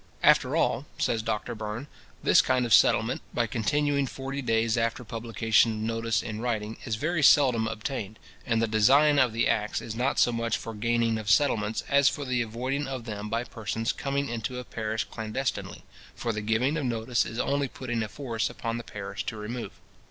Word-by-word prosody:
"After - - +5
all," 130 +6 +1
says 115 -2 0
Doctor 110 +1 -3
Burn, 110 +3 -5 0.4
"this - - +6
kind 125 -1 +1
of 115 - +1
settlement, - - +4
by - - +2
continuing 140 +4 0
forty 135 +2 -5
days 115 -2 +1
after 115 +1 -1
publication 115 0 +1
of - - -5
notice 115 0 -1
in 110 -1 -5
writing, 110 -3 -2
is 115 -4 -1
very 155 +8 -1
seldom 130 -6 +5
obtained; 110 -2 -4 0.3
and 115 -2 +1
the 115 - +2
design 140 +8 +5
of 125 -4 +4
the 115 +1 +1
acts 105 0 0
is 110 - -6
not 125 +4 0
so 120 - +4
much 115 -1 -1
for 115 - -7
gaining 115 +1 +1
of 110 -1 -5
settlements, 110 -2 +2
as 140 0 +5
for 145 - -5
the 125 -2 0
avoiding 130 +5 -2
of 130 -3 -5
them 105 -2 -5
by 115 +2 -1
persons 115 -1 -3
coming 140 0 -2
into 120 +2 -4
a 125 - -4
parish 110 -2 -3
clandestinely, 110 +4 -4 0.3
for 115 -1 -2
the 105 - -3
giving 115 +8 +1
of 150 - -2
notice 120 0 0
is 115 - -7
only 140 +2 0
putting 120 -2 -4
a 110 - -2
force 115 -1 -3
upon 115 0 -4
the - - -7
parish 100 -2 -6
to 110 - -4
remove. 115 +3 -5
115 Hz, 195 wpm, -27 LUFS, 110-130 Hz, 0.4 s, this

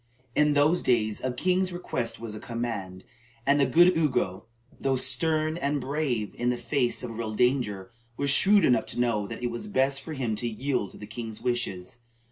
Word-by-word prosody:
In 150 +2 +3
those 150 +5 +3
days 110 -4 +1
a 130 - 0
king's 185 +7 +1
request 120 -10 -3
was 115 -2 -6
a 105 - -7
command, 110 -6 -5 0.4
and 140 +1 +4
the 140 - +4
good 175 +6 +5
Ugo, 125 - 0 0.3
though 135 -1 +1
stern 155 +5 +1
and 145 -3 0
brave 130 -6 -2
in 120 0 +1
the 125 - 0
face 125 -2 -1
of 120 - -4
real 110 -1 -4
danger, 120 -5 0 0.3
was 140 -1 +1
shrewd 200 +4 +5
enough 120 -3 +3
to - - -5
know 115 -4 +1
that 115 +2 -7
it 120 - 0
was 120 - -5
best 135 -7 +1
for 160 - -7
him 125 -6 -2
to 120 - -2
yield 120 -2 -2
to - - -13
the 105 - -8
king's 110 +1 -7
wishes. 120 -3 -3
125 Hz, 195 wpm, -27 LUFS, 115-145 Hz, 0.4 s, good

